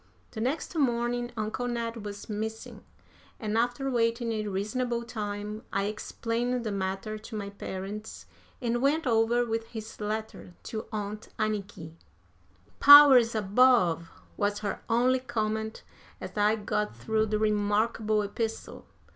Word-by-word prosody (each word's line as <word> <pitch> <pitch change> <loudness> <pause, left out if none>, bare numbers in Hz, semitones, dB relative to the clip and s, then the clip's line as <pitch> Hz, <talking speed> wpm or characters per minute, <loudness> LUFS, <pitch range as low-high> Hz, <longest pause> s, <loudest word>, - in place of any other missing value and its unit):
The 220 - -6
next 280 +8 -2
morning 240 -4 0
Uncle 220 +3 -2
Ned 230 -2 -3
was 205 -1 -7
missing, 220 +1 -5 0.6
and, 215 -2 -2
after 245 +4 0
waiting 230 0 +1
a 215 -1 -2
reasonable 235 +5 -2
time 210 -2 -5
I 195 - 0
explained 230 +3 -2
the 220 - -2
matter 195 +2 -3
to 220 +1 -9
my 200 -1 -4
parents, 200 +2 -7 0.3
and 240 -1 -1
went 295 +4 +2
over 235 0 +3
with 225 0 -2
his 220 -2 -8
letter 215 -4 -5
to 220 -1 -5
Aunt 210 0 -5
Anniky. 200 -7 -3 0.9
"Powers 275 -5 +9
above!" 205 -6 +3 0.3
was 205 0 0
her 200 - -3
only 250 +3 +3
comment 220 -3 -3 0.4
as - - -8
I 210 +1 +3
got 210 0 -2
through 220 0 0
the 215 0 0
remarkable 215 +1 +1
epistle. 220 +2 -4
220 Hz, 130 wpm, -28 LUFS, 210-240 Hz, 0.9 s, Powers